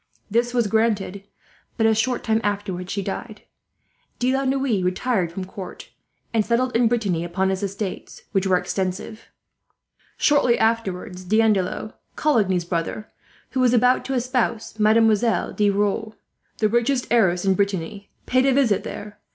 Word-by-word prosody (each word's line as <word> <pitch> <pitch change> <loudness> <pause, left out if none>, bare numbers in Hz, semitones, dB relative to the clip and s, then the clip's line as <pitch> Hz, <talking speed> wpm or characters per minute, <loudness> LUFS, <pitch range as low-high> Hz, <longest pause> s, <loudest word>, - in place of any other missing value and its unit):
This 240 +2 +1
was 240 -2 +1
granted, 205 -2 0 0.5
but 225 - +2
a 220 - +5
short 240 +3 0
time 220 0 +1
afterwards 195 -3 -3
she 200 - -2
died. 210 +3 -6 0.7
De 255 +1 +1
La 270 0 0
Noue 265 -6 +1
retired 185 -1 0
from 185 +2 -5
court, 190 0 -9 0.4
and 225 -2 +3
settled 245 +3 0
in 235 0 +4
Brittany 205 -8 0
upon 185 +3 -1
his 190 - -2
estates, 200 0 -5
which 195 -1 +1
were 185 -1 +4
extensive. 190 +4 -4 0.9
"Shortly 280 -5 +3
afterwards 200 -4 -1
D'Andelot, 215 0 +1 0.2
Coligny's 195 - +1
brother, 170 +5 -3 0.4
who 260 - -2
was 250 -1 +4
about 250 +2 +3
to 270 - -2
espouse 240 -3 -1
Mademoiselle 220 +1 +3
De 210 -1 +2
Rieux, 205 +2 0 0.4
the 215 - +2
richest 240 +4 +1
heiress 190 -6 +3
in 195 - +4
Brittany, 200 0 -2 0.2
paid 255 +1 +2
a 270 - +4
visit 250 -7 +2
there. 210 0 -8
215 Hz, 150 wpm, -23 LUFS, 190-240 Hz, 0.9 s, a